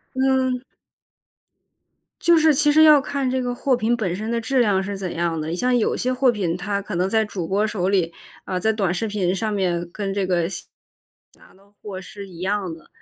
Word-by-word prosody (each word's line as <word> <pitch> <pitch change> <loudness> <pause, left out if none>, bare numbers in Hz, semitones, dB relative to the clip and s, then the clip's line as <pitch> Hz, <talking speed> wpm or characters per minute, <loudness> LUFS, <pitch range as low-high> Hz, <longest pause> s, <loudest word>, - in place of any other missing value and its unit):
嗯。 260 -1 +1 1.6
就 340 -1 +5
是 315 -1 +5
其 295 +2 +3
实 310 +2 +6
要 305 -2 +7
看 275 -1 -2
这 260 0 0
个 245 -1 -2
货 260 +1 +1
品 240 0 0
本 185 -6 -2
身 215 +4 -4
的 235 0 0
质 255 +3 0
量 205 -5 +3
是 200 +1 -4
怎 190 -2 -5
样 165 -1 -1
的， 155 - -4
你 165 - -2
像 250 +7 +1
有 235 - +1
些 255 +1 0
货 255 0 +3
品 185 -7 -2
它 200 +2 -2
可 205 +1 -8
能 180 +2 +1
在 220 0 +2
主 185 -6 -5
播 200 +3 +1
手 195 -4 -1
里， 180 -4 +1 0.3
啊， 185 - -2
在 220 +3 +2
短 200 -5 0
视 205 +5 -2
频 195 -4 0
上 215 +3 -2
面， 175 -4 -1
跟 200 -1 -3
这 195 -1 -1
个 175 -2 +1
下 175 -1 -6 0.7
拿 - - -21
到 200 +2 -25
货 195 -3 -6
是 200 +1 -10
一 175 -3 -13
样 190 -1 -2
的。 160 -1 -13
205 Hz, 240 characters per minute, -22 LUFS, 185-245 Hz, 1.6 s, 要